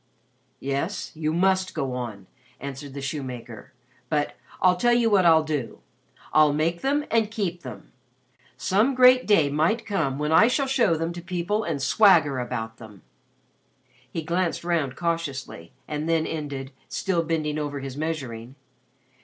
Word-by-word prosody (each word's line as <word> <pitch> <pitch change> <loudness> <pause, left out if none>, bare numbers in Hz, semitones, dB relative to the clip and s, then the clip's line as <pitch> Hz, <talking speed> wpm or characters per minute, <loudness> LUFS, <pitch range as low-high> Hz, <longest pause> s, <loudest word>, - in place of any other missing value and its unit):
"Yes, 140 +8 -3
you 155 -1 -2
must 185 +2 +1
go 135 -5 -2
on," 115 -6 -5 0.3
answered 140 0 -7
the 140 - -5
shoemaker. 125 -5 -6 0.4
"But 150 -2 0 0.2
I'll 180 -1 +4
tell 240 +6 +3
you 235 -2 +2
what 190 -4 +5
I'll 160 -1 +6
do 150 -6 -3 0.6
I'll 155 -1 +5
make 165 +3 0
them 290 +2 +1
and 225 -2 +2
keep 190 -6 -3
them. 120 -7 -10 0.7
Some 220 +8 +2
great 255 0 +6
day 160 -9 +4
might 165 +11 +1
come 160 -10 -1
when 150 +1 -1
I 185 +8 +7
shall 275 +3 +1
show 260 -10 +2
them 165 +2 -2
to 175 - -7
people 180 +4 -2
and 160 -6 -2
swagger 145 -2 +4
about 115 -2 -4
them." 105 -4 -13 1.1
He 165 - -4
glanced 170 +2 -1
round 160 -7 0
cautiously, 150 - -3 0.2
and 150 +1 -3
then 165 -1 +2
ended, 140 -4 -5 0.2
still 190 -4 0
bending 155 -2 -1
over 145 -1 -3
his 135 -1 -6
measuring. 135 -6 -4
160 Hz, 155 wpm, -25 LUFS, 140-185 Hz, 1.1 s, I